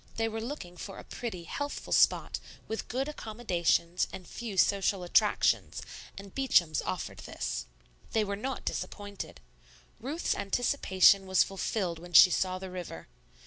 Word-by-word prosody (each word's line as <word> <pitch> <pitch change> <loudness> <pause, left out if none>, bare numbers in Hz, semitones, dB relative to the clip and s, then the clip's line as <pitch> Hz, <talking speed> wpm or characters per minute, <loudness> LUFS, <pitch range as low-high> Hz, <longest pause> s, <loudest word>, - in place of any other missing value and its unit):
They 225 0 0
were 225 0 -4
looking 225 -8 -6
for 195 +2 -7
a - - -9
pretty, 215 -8 -6
healthful 285 +11 -4
spot, - - +3 0.3
with 220 - -4
good 265 +4 -1
accommodations 185 - 0
and 185 - -9
few 225 -5 -6
social 195 -1 +3
attractions, 175 - +2 0.3
and 195 -1 -10
Beacham's 175 - +3
offered - - -4
this. - - -4 0.5
They 220 - +3
were 200 -1 -2
not 260 +6 -4
disappointed. 205 -1 -5 0.6
Ruth's 285 +9 -1
anticipation 195 -3 +3
was 190 0 +5
fulfilled 190 -3 -2
when 175 +1 -12
she 180 +2 +10
saw 185 0 0
the 185 0 -7
river. 175 - -7
195 Hz, 145 wpm, -30 LUFS, 180-225 Hz, 0.6 s, she